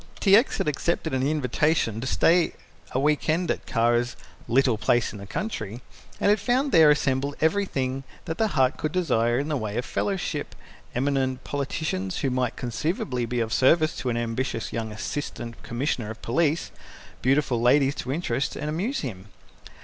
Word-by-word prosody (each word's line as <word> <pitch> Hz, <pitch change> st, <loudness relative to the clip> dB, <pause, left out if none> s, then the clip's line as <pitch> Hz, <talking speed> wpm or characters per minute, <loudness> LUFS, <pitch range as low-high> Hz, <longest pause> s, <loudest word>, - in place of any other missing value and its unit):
T. 195 Hz, -1 st, +6 dB
X. 230 Hz, +6 st, +3 dB
had -, -, -1 dB
accepted 160 Hz, +1 st, -1 dB
an 130 Hz, -, +1 dB
invitation 145 Hz, -4 st, +1 dB
to 130 Hz, -, -3 dB
stay 170 Hz, +5 st, +3 dB, 0.4 s
a 130 Hz, -, 0 dB
weekend 155 Hz, +4 st, +1 dB
at -, -, -4 dB
Kara's 120 Hz, +1 st, +1 dB, 0.3 s
"little 125 Hz, 0 st, +3 dB
place 120 Hz, +2 st, +1 dB
in 105 Hz, -, -8 dB
the 100 Hz, -, -9 dB
country," 110 Hz, -, -4 dB, 0.4 s
and -, -, +3 dB
had 210 Hz, -, +3 dB
found 255 Hz, +6 st, +1 dB
there 160 Hz, -3 st, +7 dB
assembled 140 Hz, -1 st, +1 dB
everything 140 Hz, -7 st, 0 dB, 0.2 s
that 160 Hz, -2 st, -4 dB
the 220 Hz, -, +3 dB
heart 135 Hz, -9 st, +2 dB
could 155 Hz, -, -2 dB
desire 120 Hz, -10 st, +1 dB
in 140 Hz, +3 st, -1 dB
the 155 Hz, -, -1 dB
way 110 Hz, -4 st, -3 dB
of 120 Hz, -, -1 dB
fellowship, 180 Hz, -7 st, -2 dB, 0.4 s
eminent 130 Hz, 0 st, 0 dB
politicians 140 Hz, -9 st, -2 dB
who 135 Hz, -, 0 dB
might 125 Hz, -1 st, 0 dB
conceivably 125 Hz, -, -2 dB
be 120 Hz, +1 st, -1 dB
of 115 Hz, -1 st, -2 dB
service 155 Hz, +4 st, +4 dB
to 130 Hz, -, -2 dB
an 120 Hz, -, 0 dB
ambitious 115 Hz, 0 st, -2 dB
young 110 Hz, -1 st, -3 dB
Assistant 115 Hz, +2 st, -5 dB
Commissioner 120 Hz, -2 st, -2 dB
of 110 Hz, -, -8 dB
Police, 155 Hz, +6 st, +1 dB, 0.5 s
beautiful 130 Hz, -2 st, +2 dB
ladies 135 Hz, +3 st, +4 dB
to 130 Hz, -, -5 dB
interest 140 Hz, -4 st, -1 dB
and 150 Hz, -, -3 dB
amuse 200 Hz, -, -1 dB
him. 105 Hz, -8 st, -6 dB
135 Hz, 170 wpm, -25 LUFS, 120-155 Hz, 0.5 s, there